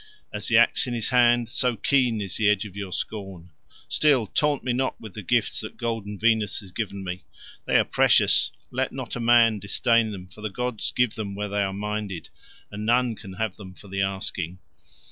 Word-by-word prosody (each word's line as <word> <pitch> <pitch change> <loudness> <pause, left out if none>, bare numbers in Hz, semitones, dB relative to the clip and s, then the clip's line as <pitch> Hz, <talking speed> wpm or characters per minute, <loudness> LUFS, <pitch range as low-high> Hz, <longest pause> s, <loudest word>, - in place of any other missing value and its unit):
As - - -3
the - - +4
axe - - +4
in 120 - -2
his 115 - -2
hand, 120 -2 +4
so 120 +1 0
keen 120 0 +1
is 95 -3 -3
the 105 -1 +3
edge 105 0 +1
of 100 -2 -10
your 100 -2 -5
scorn. 95 -5 -5 0.4
Still, 140 -7 +3
taunt 145 +7 0
me 125 - 0
not 130 +1 -1
with 110 -4 -10
the 105 - -6
gifts 115 +3 +1
that 110 - -7
golden 110 -4 -3
Venus 110 -1 +2
has 95 -3 -13
given 100 -1 -4
me; 90 -2 -5 0.4
they - - +3
are - - +5
precious; - - +4 0.2
let - - -1
not - - -6
a - - -4
man 115 -2 +5
disdain 115 +3 +2
them, 95 -3 -8
for 90 +4 -15
the 110 - -3
gods 125 +1 -2
give 125 -3 +1
them 100 -3 -5
where 105 0 -3
they 100 0 0
are 100 -1 0
minded, 105 -2 -4 0.4
and 105 +1 -6
none 120 +2 +2
can 95 -2 -10
have 105 0 -3
them 95 -3 -11
for 100 - -14
the 95 +1 -2
asking. 95 -2 -3
105 Hz, 210 wpm, -25 LUFS, 100-120 Hz, 0.4 s, are